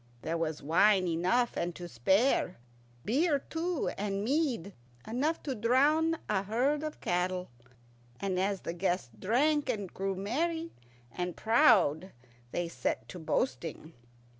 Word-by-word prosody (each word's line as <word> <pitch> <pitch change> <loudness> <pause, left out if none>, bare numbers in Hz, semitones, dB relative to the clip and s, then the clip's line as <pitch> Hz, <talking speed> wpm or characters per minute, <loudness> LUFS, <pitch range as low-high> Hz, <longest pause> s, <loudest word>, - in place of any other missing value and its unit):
There 165 - -1
was 160 -3 -2
wine 185 +5 +4
enough 185 +9 +1
and 175 -1 -2
to 175 - -7
spare, 190 - +2 0.5
beer 285 - +2
too, 325 +4 -2
and 200 -1 -1
mead 250 - 0 0.3
enough 280 +8 -1
to 275 - -2
drown 285 +8 +3
a 200 -2 +1
herd 250 +9 0
of 310 -1 -5
cattle. 180 +1 -1 0.7
And 190 -2 -1
as 195 0 0
the 170 - -4
guests 175 -7 -1
drank 290 - +2
and 200 -4 -3
grew 195 0 -2
merry 320 - -2 0.4
and 180 +3 -4
proud 195 -7 +4 0.4
they 175 -1 -1
set 170 - -3
to 180 - -7
boasting. 160 - -2
200 Hz, 135 wpm, -31 LUFS, 180-275 Hz, 0.7 s, wine